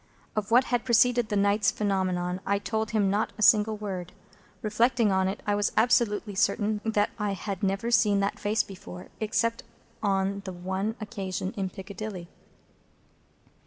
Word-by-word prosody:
Of 210 -2 -2
what 245 +3 +6
had 245 -2 -1
preceded 240 -1 +3
that 205 - -1
night's 200 0 +3
phenomenon, 185 -3 -1
I 200 - +1
told 220 +1 -2
him 205 -4 +1
not 210 +2 0
a 215 - -1
single 215 0 +5
word. 185 -4 -5 0.5
Reflecting 230 +1 +2
on 190 0 +2
it, 195 +2 -4
I 205 - +1
was 205 0 +1
absolutely 225 -3 +2
certain 205 +2 +1
that 210 -2 +1
I 205 -1 0
had 195 -1 -5
never 195 +4 -1
seen 205 -3 +4
that 200 - -1
face 210 +1 +1
before, 180 -2 -10
except 230 +1 0 0.4
on 195 -1 0
the 190 - -6
one 190 +5 -3
occasion 195 -3 -4
in 195 -3 -2
Piccadilly. 190 -2 -7
205 Hz, 160 wpm, -27 LUFS, 195-220 Hz, 0.5 s, what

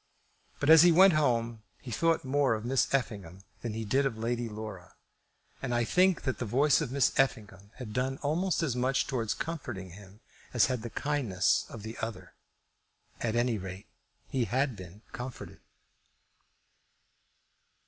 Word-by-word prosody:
But 145 +2 +3
as 160 -1 +10
he 175 0 +7
went 185 +2 +7
home 120 -6 +1 0.2
he 125 - -9
thought 165 +4 +1
more 135 -2 +2
of 110 +1 -6
Miss 130 +1 +1
Effingham 100 -9 -2 0.2
than 115 -3 -4
he 110 0 -4
did 135 +7 +2
of 130 -5 -1
Lady 120 +1 -2
Laura; 105 -4 -8 0.7
and 125 -3 -2
I 120 - +2
think 180 +8 +2
that 130 - -2
the - - -2
voice 140 +8 +3
of 140 -5 -3
Miss 140 0 +2
Effingham 105 -7 -1
had 115 -5 -8
done 130 +3 -1
almost 170 +5 0
as 135 -7 -1
much 130 +2 +1
towards 115 -5 -2
comforting 125 - -5
him 100 +2 -14 0.4
as 120 - +5
had 130 -3 -2
the 120 - -6
kindness 120 -9 0
of 110 -3 -9
the 110 +1 -7
other. 115 0 -6 0.9
At 115 -1 -1
any 120 -2 +1
rate, 95 +2 -8 0.4
he 130 -3 -1
had 130 +1 0
been 95 +2 -12
comforted. 125 0 -8
120 Hz, 160 wpm, -30 LUFS, 110-135 Hz, 0.9 s, as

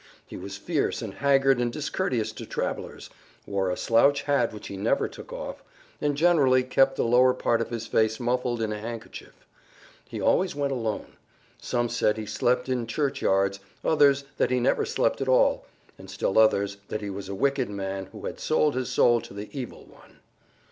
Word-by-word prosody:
He - - -10
was 100 +2 -7
fierce 145 - -1
and 105 -3 -6
haggard 135 -1 +3
and 120 -1 0
discourteous 140 - -2
to - - -9
travelers, - - -4 0.3
wore 95 -2 -1
a 90 - -2
slouch 140 +5 +3
hat 140 -5 +1
which 105 -1 -10
he 100 - -7
never 95 - +1
took - - -12
off, - - -6 0.4
and 145 -1 0
generally 145 -6 +4
kept 135 +1 +3
the - - 0
lower 125 +2 +4
part 115 -2 +1
of 115 - -3
his 115 -1 -4
face 110 -1 +1
muffled 120 -1 -1
in 110 - -2
a 105 - -5
handkerchief. 115 +1 -9 0.6
He - - -5
always 185 -5 +2
went 140 -1 -1
alone. 115 -4 -4 0.4
Some 120 0 0
said 105 -2 +1
he 110 - -4
slept 125 +5 0
in 125 -3 -1
church 140 +4 -1
yards, 95 0 +2 0.3
others 140 -3 +4
that - - +2
he 125 0 +1
never 120 - +2
slept 115 - 0
at 135 - -1
all, 130 - +3 0.3
and - - -12
still 95 - 0
others 100 -2 +3
that 105 - -4
he 100 -1 -4
was 100 0 -7
a 100 - -4
wicked 135 +3 0
man 95 -1 -4
who - - -10
had - - -5
sold 155 -1 +2
his 130 -1 -2
soul 120 -1 +4
to - - -12
the 105 +1 -7
Evil 130 -4 -7
One. - - -20
120 Hz, 195 wpm, -26 LUFS, 105-135 Hz, 0.6 s, generally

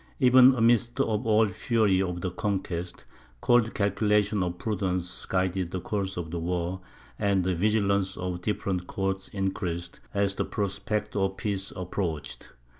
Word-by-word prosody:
Even 130 0 +7
amidst 120 0 +3
all 110 0 +3
the 100 - -5
fury 105 -3 +2
of 90 -2 -2
the 90 - -2
conquest, 90 -3 -3 0.3
cold 120 - +3
calculations 105 0 +2
of 90 0 -3
prudence 90 -3 -2
guided 95 -1 0
the 95 - -3
course 95 0 -3
of 80 -2 -4
the 85 - -3
war, 90 +2 -2 0.4
and 100 -2 +2
the 95 +1 +1
vigilance 100 0 +1
of 90 0 -2
the 90 - -6
different 90 -2 -2
courts 95 0 -2
increased, 95 -3 -3
as 100 -1 +1
the - - -1
prospect 105 +1 -2
of 95 -1 0
peace 100 -2 -2
approached. 90 -4 -4
95 Hz, 150 wpm, -27 LUFS, 90-105 Hz, 0.4 s, Even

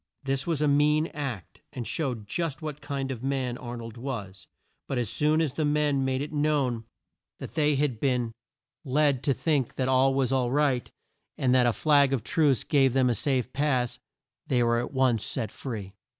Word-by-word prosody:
This 135 +1 -1
was 155 -3 0
a - - +3
mean 150 +2 +3
act, 130 - -6
and 120 - -5
showed 125 -9 -3
just 155 +3 -3
what 150 -1 -5
kind 140 -2 -3
of 120 -3 -5
a - - -5
man 130 -3 -1
Ar 120 -1 -6
nold 115 0 -8
was, 105 -7 -6 0.4
but 135 - -2
as 120 -4 -1
soon 155 +2 +2
as 150 -5 0
the 155 - -1
men 145 -2 +2
made 130 +1 0
it 150 - -7
known 145 -6 0 0.5
that - - -8
they 150 -2 +2
had 135 -5 0
been 125 -3 0 0.5
led 140 -2 +2
to 140 - +2
think 140 -2 0
that 130 - -1
all 130 +1 +3
was 135 -2 +1
right, 130 0 +1 0.5
and 125 -1 +2
that 125 -1 +5
a - - +4
flag 140 -1 +3
of 125 -5 -1
truce 140 -4 +2
gave 135 -4 +3
them 130 -2 +3
a - - +2
safe 130 +2 0
pass, 130 -4 0 0.5
they 125 -2 +2
were 120 0 +2
at 120 - -4
once 130 -5 +2
set 110 -3 -2
free. 105 -7 -6
135 Hz, 195 wpm, -27 LUFS, 125-145 Hz, 0.5 s, that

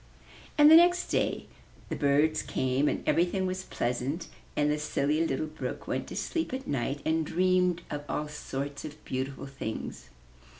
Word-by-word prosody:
And 295 0 +8
the - - +11
next 350 +1 +5
day - - 0 0.4
the - - -2
birds 145 +2 +3
came 130 +3 0
and - - -3
everything 180 +3 +2
was 185 0 -2
pleasant, 125 +7 -2 0.3
and 150 0 +2
the 150 - 0
Silly 150 +1 +1
Little 135 +2 -1
Brook 155 0 -6
went - - -2
to - - -7
sleep 325 -6 -2
at 265 - -6
night 140 +1 -2
and 160 0 +2
dreamed 180 +1 +2
of 145 0 -3
all 150 - -1
sorts 145 -1 -5
of 155 0 -9
beautiful 135 +1 -3
things. 135 -5 -6
150 Hz, 165 wpm, -29 LUFS, 140-180 Hz, 0.4 s, the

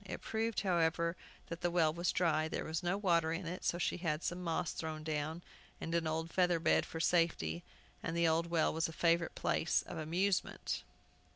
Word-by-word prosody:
It 200 - -7
proved, 225 0 -1
however, 170 -2 +1 0.3
that 170 0 -7
the 175 - +2
well 165 -3 +3
was 170 +1 0
dry. 160 -3 +2
There - - -3
was 160 0 -2
no 175 +2 0
water 170 -5 +2
in 165 +2 -3
it; 180 +2 -5
so 175 - +1
she 175 - 0
had 165 -3 -1
some 175 +1 -2
moss 165 0 -1
thrown 155 -1 -5
down, 155 +2 -2 0.4
and 165 - -4
an 170 -1 +1
old 160 +1 -2
feather 180 -2 +3
bed, - - +3
for 165 - -6
safety, 160 - +1 0.4
and 165 - -3
the 170 0 +4
old 165 +1 +2
well 165 -2 +2
was 160 +1 +1
a 160 - -8
favorite 170 +1 +2
place 160 - +1
of 170 - -7
amusement. 175 +5 0
170 Hz, 200 wpm, -35 LUFS, 160-175 Hz, 0.4 s, the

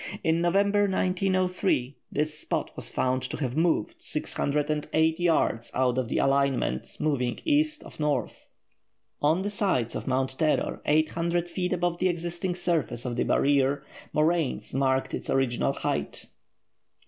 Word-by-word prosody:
In 160 +1 +2
November 200 +4 +3
1903, 185 -7 0 0.2
this 155 +1 -1
spot - - -2
was - - -3
found 130 0 0
to 130 - -5
have 130 -4 -2
moved 160 -8 +1
608 150 +2 0
yards 160 -9 +1
out 130 -1 +2
of 125 -3 -2
the - - -1
alignment, 135 - +1
moving 125 -5 0
east 305 0 +2
of - - -13
north. 150 -1 -2 0.7
On 160 +6 +2
the 205 - -2
sides 185 - 0
of - - -5
Mount 130 0 -1
Terror, 155 -2 +1
800 165 +3 +1
feet 180 +1 -2
above 175 -1 0
the 185 - +3
existing 175 +1 -2
surface 160 -9 -1
of 120 -1 -2
the - - 0
barrier, 140 0 +2 0.3
moraines 155 -2 0
marked 135 0 +1
its - - -4
original 130 -3 +1
height. - - -3
155 Hz, 140 wpm, -27 LUFS, 135-175 Hz, 0.7 s, November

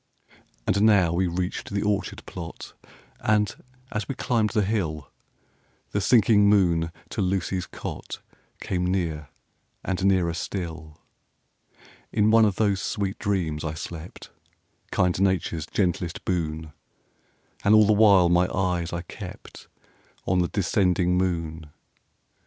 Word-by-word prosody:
And 100 - +1
now 100 -6 +4
we 90 +2 +1
reached 90 +1 -3
the 100 0 -1
orchard 105 -1 -2
plot; 85 -1 -8 0.5
And, 105 -1 +1 0.4
as 105 -2 -3
we 135 - -2
climbed 115 -4 +1
the 105 0 +1
hill, 85 -9 -2 0.8
The 100 - 0
sinking 105 -2 +5
moon 85 -5 +3 0.2
to - - -3
Lucy's 95 -1 -1
cot - - -7 0.4
Came 90 -1 -2
near, 80 -5 -2 0.6
and 95 -1 -2
nearer 95 -4 +2
still. 80 -3 -5 1.1
In 105 +1 +3
one 115 0 +6
of 100 -3 +1
those 100 -3 +1
sweet 100 -2 -2
dreams 90 -7 -1
I 80 -1 -3
slept, 85 +1 -8 0.6
Kind 90 0 +1
Nature's 90 -5 0
gentlest 90 -3 -1
boon! 80 -3 -2 0.9
And 105 +2 +5
all 110 0 +7
the 105 - +4
while 100 -4 +6
my 90 +1 +3
eyes 90 -2 -1
I 85 0 -4
kept - - -10 0.6
On 90 0 +2
the 90 - +2
descending 90 -2 +1
moon. 85 -4 -2
90 Hz, 130 wpm, -25 LUFS, 85-100 Hz, 1.1 s, all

